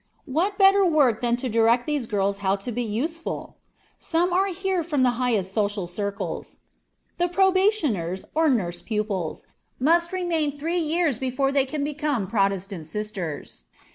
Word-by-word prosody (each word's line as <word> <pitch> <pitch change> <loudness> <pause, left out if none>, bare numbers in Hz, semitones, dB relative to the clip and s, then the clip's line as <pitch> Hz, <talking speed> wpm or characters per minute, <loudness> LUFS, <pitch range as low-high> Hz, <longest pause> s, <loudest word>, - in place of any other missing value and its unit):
What 350 +9 0
better 390 0 +6
work 295 - +3
than 240 -1 +2
to 250 +2 -3
direct 230 +1 +3
these 295 -6 -1
girls 200 -1 0
how 195 -1 +1
to 200 +5 -5
be 240 +2 -2
useful? 285 +10 -4 0.4
Some 350 +2 +1
are 380 +2 +3
here 380 -1 -1
from 295 -5 0
the 250 - +4
highest 210 -7 0
social 205 -3 0
circles. 200 +3 -4 0.6
The 350 - +3
"probationers," 355 - +1
or 320 0 +3
nurse 175 -9 0
pupils, 205 -5 -3 0.3
must 340 +5 +3
remain 330 -6 -1
three 330 +5 -1
years 320 -5 +1
before 265 +1 0
they 275 -1 +2
can 295 +1 -3
become 295 -6 -1
Protestant 195 -4 -1
"sisters." 190 -4 -5
255 Hz, 150 wpm, -24 LUFS, 205-330 Hz, 0.6 s, better